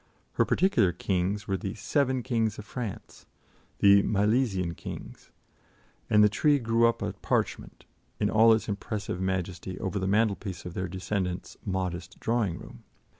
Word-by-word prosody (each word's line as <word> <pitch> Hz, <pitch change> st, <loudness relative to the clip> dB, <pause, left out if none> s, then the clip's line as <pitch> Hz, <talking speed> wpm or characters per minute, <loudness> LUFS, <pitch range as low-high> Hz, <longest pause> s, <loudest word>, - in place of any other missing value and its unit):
Her -, -, +2 dB
particular 185 Hz, -, +3 dB
kings 95 Hz, +4 st, -1 dB
were 95 Hz, -2 st, 0 dB
the 95 Hz, +3 st, -5 dB
"seven 130 Hz, +3 st, 0 dB
kings 115 Hz, -4 st, 0 dB
of 105 Hz, -, -8 dB
France" 115 Hz, -3 st, -7 dB, 0.5 s
the 100 Hz, 0 st, +7 dB
"Milesian 100 Hz, -4 st, +1 dB
kings" -, -, -9 dB, 0.8 s
and 105 Hz, 0 st, +6 dB
the -, -, +7 dB
tree 145 Hz, +8 st, +3 dB
grew 115 Hz, -2 st, +3 dB
up 115 Hz, -, -1 dB
a -, -, -2 dB
parchment, -, -, -2 dB, 0.3 s
in -, -, +2 dB
all 115 Hz, +1 st, +5 dB
its 110 Hz, 0 st, +2 dB
impressive 100 Hz, -2 st, -4 dB
majesty, 95 Hz, -1 st, -3 dB
over 100 Hz, +1 st, -2 dB
the 95 Hz, -, -1 dB
mantelpiece 100 Hz, -3 st, 0 dB
of 90 Hz, -, -6 dB
their 90 Hz, +1 st, -3 dB
descendant's 95 Hz, 0 st, -3 dB
modest 90 Hz, -2 st, -3 dB
drawing 115 Hz, -7 st, 0 dB
room. 60 Hz, -, -12 dB
100 Hz, 150 wpm, -28 LUFS, 95-115 Hz, 0.8 s, the